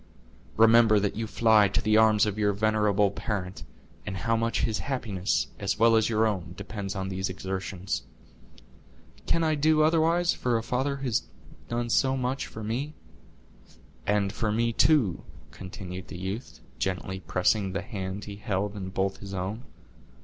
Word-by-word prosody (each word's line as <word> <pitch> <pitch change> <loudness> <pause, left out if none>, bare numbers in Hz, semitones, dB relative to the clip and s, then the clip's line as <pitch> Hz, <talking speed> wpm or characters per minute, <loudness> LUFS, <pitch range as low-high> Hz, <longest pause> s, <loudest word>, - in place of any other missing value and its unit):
Remember 115 -1 +6
that 100 0 -1
you 110 +1 -3
fly 110 -2 +4
to 95 - 0
the 110 0 +2
arms 110 -1 +5
of 105 0 -3
your 105 -1 +2
venerable 105 -1 +2
parent, 95 -6 -4 0.4
and 95 -2 -5
how 115 +3 0
much 115 0 0
his 110 -2 0
happiness, 110 -9 -1
as 100 -1 -1
well 115 +1 +5
as 110 0 +3
your 110 0 +2
own, 90 -5 -2
depends 100 -2 -5
on 95 0 -3
those 95 0 -2
exertions." 95 -4 -4 1.3
"Can 165 - +2
I 160 -1 +2
do 155 +1 +3
otherwise 165 +2 +3
for 120 -2 0
a 115 - -3
father 130 +4 -1
who 140 - -8
has 120 -4 0 0.4
done 120 0 -2
so 135 +2 +2
much 130 +1 -2
for 110 - -8
me?" 130 +8 -3 1.1
"And 100 -1 +1
for 110 -1 -1
me, 115 +2 +1
too," 125 - +3 0.3
continued 95 -1 -8
the - - -8
youth, 95 +7 -6 0.2
gently 95 0 -2
pressing 95 +2 +1
the 100 0 -2
hand 100 -2 -5
he 100 -1 -8
held 105 -1 -2
in 95 -2 -5
both 95 +1 -1
his 100 -1 -8
own. 100 +7 -4
105 Hz, 165 wpm, -27 LUFS, 95-115 Hz, 1.3 s, Remember